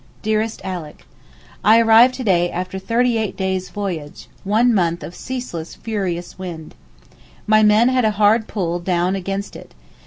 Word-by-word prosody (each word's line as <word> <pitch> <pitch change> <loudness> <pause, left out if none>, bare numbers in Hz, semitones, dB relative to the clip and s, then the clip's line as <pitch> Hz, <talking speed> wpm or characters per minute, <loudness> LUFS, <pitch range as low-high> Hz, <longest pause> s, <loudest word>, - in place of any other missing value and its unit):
DEAREST 220 +1 -1
ALICK, 180 -6 -7 0.6
I 220 +2 +6
arrived 230 +3 +6
to 260 - -5
day, 175 -5 +2
after 185 +2 -4
thirty 230 +4 +1
eight 215 -3 -3
days' 190 -1 -2
voyage, 175 -8 -6
one 225 +5 +2
month 175 -4 0
of 170 - -8
ceaseless 245 -10 -6
furious 185 -6 -4
wind. 170 -4 -7 0.7
My 215 0 +4
poor 215 - +5
men 215 +4 +4
had 255 -2 +2
a - - +4
hard 215 +2 +3
pull 175 -4 -2
down 180 +1 0
against 195 +1 -4
it. - - -13
195 Hz, 160 wpm, -20 LUFS, 175-225 Hz, 0.7 s, I